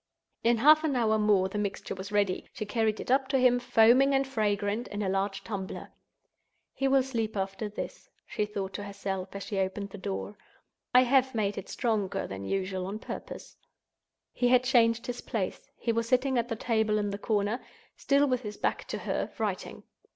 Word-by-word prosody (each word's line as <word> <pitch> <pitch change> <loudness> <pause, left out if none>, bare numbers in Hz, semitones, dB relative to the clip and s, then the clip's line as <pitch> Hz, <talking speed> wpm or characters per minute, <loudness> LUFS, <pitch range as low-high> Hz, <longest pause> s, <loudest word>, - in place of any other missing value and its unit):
In 235 0 +4
half 305 +6 +6
an 300 -4 0
hour 220 -3 +2
more 205 -3 +3
the 205 +2 -4
mixture 200 -1 -3
was 195 +2 -7
ready. 200 -3 0
She 215 - -4
carried 220 0 0
it - - -4
up 265 0 +3
to 270 0 +1
him, 250 -1 +4
foaming 245 +4 +5
and 270 0 +1
fragrant, 210 -2 -1
in 205 0 -4
a 190 - 0
large 195 +1 -1
tumbler. 195 -3 -6 0.8
"He 270 - 0
will 270 -1 +4
sleep 225 -5 -3
after 195 +2 -3
this," 205 - -7 0.2
she 210 - -2
thought 195 -2 -4
to 205 - -5
herself, 195 -2 -4
as 200 - -4
she 200 - -3
opened 195 +1 -2
the 205 - -8
door; 200 +1 -5 0.5
"I 250 - +7
have 260 0 +3
made 205 -2 0
it 195 - -7
stronger 215 -6 -1
than 95 0 -6
usual 190 - -2
on 200 +2 -4
purpose." - - -8 0.8
He 245 - +1
had 250 0 +5
changed 235 -2 +3
his 245 0 -4
place. 200 -5 -4
He 235 - -1
was 230 0 -1
sitting 260 +1 +2
at 235 - -1
the 230 - -1
table 220 -1 +1
in 205 -1 -1
the 200 - -5
corner—still 225 +6 0
with 255 -2 0
his 210 -3 -7
back - - -1
to - - -3
her, - - -2
writing. - - -3
215 Hz, 195 wpm, -29 LUFS, 200-245 Hz, 0.8 s, I